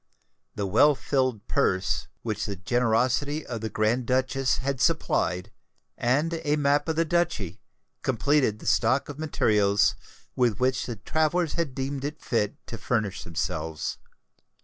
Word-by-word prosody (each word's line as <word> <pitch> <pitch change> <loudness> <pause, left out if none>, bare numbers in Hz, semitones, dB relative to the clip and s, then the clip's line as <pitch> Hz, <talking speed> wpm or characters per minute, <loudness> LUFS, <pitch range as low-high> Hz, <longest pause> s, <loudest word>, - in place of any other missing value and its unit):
The 100 - -2
well 130 +10 +5
filled 130 -6 -1
purse 100 -9 +1 0.2
which 110 -2 -2
the 100 - -3
generosity 125 - +1
of 115 -3 -5
the 110 - -3
Grand 115 +4 0
Duchess 130 +1 +1
had 135 -1 -2
supplied, 100 - +1 0.4
and 155 +7 0
a 150 0 +2
map 145 +1 +2
of 160 - 0
the 165 +1 +2
Duchy, 155 - -1 0.4
completed 130 -2 +2
the - - -13
stock 130 +5 +2
of 145 0 -7
materials 105 -9 +2 0.4
with 120 -5 +1
which 130 +1 +1
the 120 - -4
travellers 160 - 0
had 160 -6 -2
deemed 135 0 -3
it 150 +2 -4
fit 110 -4 -1
to 115 - -7
furnish 110 -5 -1
themselves. 80 -1 -3
130 Hz, 145 wpm, -26 LUFS, 110-145 Hz, 0.4 s, well